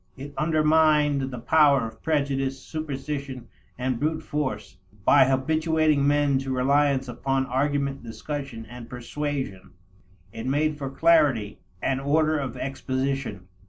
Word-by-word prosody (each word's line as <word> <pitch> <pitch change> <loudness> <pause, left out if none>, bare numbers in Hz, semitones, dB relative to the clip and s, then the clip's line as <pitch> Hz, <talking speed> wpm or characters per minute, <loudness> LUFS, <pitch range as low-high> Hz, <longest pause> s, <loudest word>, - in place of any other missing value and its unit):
It 140 +2 -8
undermined 155 -3 +3
the 125 - -6
power 140 0 +4
of 110 0 -13
prejudice, 135 -3 0
superstition, 140 -4 -5 0.3
and 125 -1 -1
brute 155 +2 -1
force, 130 -12 -3 0.3
by - - +7
habituating 155 +2 +2
men 145 -2 +3
to 135 0 -4
reliance 135 +1 +2
upon 135 +2 -1
argument, 140 +1 -1
discussion, 120 0 -6
and 120 0 -10
persuasion. 130 -4 -5 0.6
It 115 - -6
made 150 +2 0
for 135 -2 -3
clarity 135 -8 +3 0.2
and 135 0 0
order 155 +2 +2
of 135 -4 -4
exposition. 135 -6 -3
140 Hz, 125 wpm, -25 LUFS, 130-150 Hz, 0.6 s, by